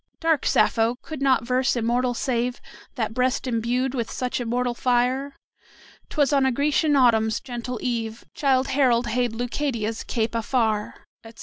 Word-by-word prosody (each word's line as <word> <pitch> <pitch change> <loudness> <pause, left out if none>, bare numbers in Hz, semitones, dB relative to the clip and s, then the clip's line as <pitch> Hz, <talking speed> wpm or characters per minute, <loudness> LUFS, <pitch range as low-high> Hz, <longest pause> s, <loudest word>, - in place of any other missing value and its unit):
Dark 325 -3 +1
Sappho! 230 +1 +2
could 310 -3 -7
not 260 -4 +3
verse 255 +1 +1
immortal 245 +1 0
save 245 0 -1 0.4
That 220 -3 -2
breast 255 +2 0
imbued 245 +2 -1
with 235 -4 -2
such 250 0 -3
immortal 245 +1 -1
fire? 255 +3 0 0.7
"'Twas 290 -3 +1
on 275 -1 +4
a 265 - +3
Grecian 290 +3 +2
autumn's 225 -4 +3
gentle 245 0 -5
eve 230 -2 -3
Childe 265 -2 +1
Harold 250 -3 +3
hailed 240 +1 0
Leucadia's 235 -2 -2
cape 225 -1 -2
afar;" 225 -2 -1 0.2
etc. 230 0 -14
245 Hz, 145 wpm, -24 LUFS, 230-265 Hz, 0.7 s, on